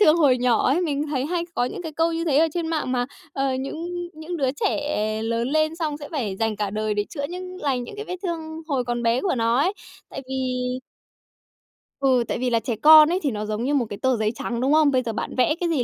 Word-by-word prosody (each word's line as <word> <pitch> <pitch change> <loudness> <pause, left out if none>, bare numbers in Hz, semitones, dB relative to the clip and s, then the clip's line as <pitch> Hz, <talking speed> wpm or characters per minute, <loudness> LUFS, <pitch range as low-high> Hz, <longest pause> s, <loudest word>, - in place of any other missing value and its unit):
thương 315 -5 +6
hồi 275 -6 +4
nhỏ 245 -2 +2
ấy. 290 +7 +3
Mình 300 -3 -1
thấy 265 -1 -1
hay 340 0 -1
có 245 - +1
những 305 - -5
cái 320 - -6
câu 325 +2 +1
như 330 0 -2
thế 295 -4 +3
ở 325 - +5
trên 340 -2 -1
mạng 310 -5 -1
mà, 245 -1 0 0.3
ờ, 270 -1 0
những 340 +6 -4
những 320 +3 -6
đứa 265 -4 +1
trẻ 220 -7 0
lớn 230 +2 -1
lên 310 +2 +1
xong 310 -3 -2
sẽ 290 -1 -9
phải 225 - -2
dành 225 0 -1
cả 205 -1 -2
đời 215 0 -1
để 205 0 0
chữa 285 -4 -4
những 365 +1 -7
lành 260 -4 0
những 410 - -10
cái 430 - -5
vết 360 -3 -5
thương 320 -3 -4
hồi 260 -4 0
còn 240 0 -2
bé 235 +2 +2
của 365 -3 0
nó 230 0 +2
ấy. 350 +8 +2 0.4
Tại - - -6
vì 255 -1 -2 1.2
ừ, 260 -3 +3
tại - - -2
vì 255 - 0
là 230 -1 +2
trẻ 230 -1 -3
con 310 +4 +8
ấy 360 - +1
thì 280 - +1
nó 210 -1 -3
giống 215 +2 -2
như 280 +3 0
một 265 -4 +2
cái 205 - -5
tờ 260 -2 +2
giấy 215 -1 +1
trắng, 235 0 -3
đúng 275 +3 +2
không? 305 -2 +5
Bây 255 - +2
giờ 225 -1 -3
bạn - - -4
vẽ 255 +5 +3
cái 350 - 0
gì 295 -7 +1
270 Hz, 265 wpm, -24 LUFS, 240-315 Hz, 1.2 s, con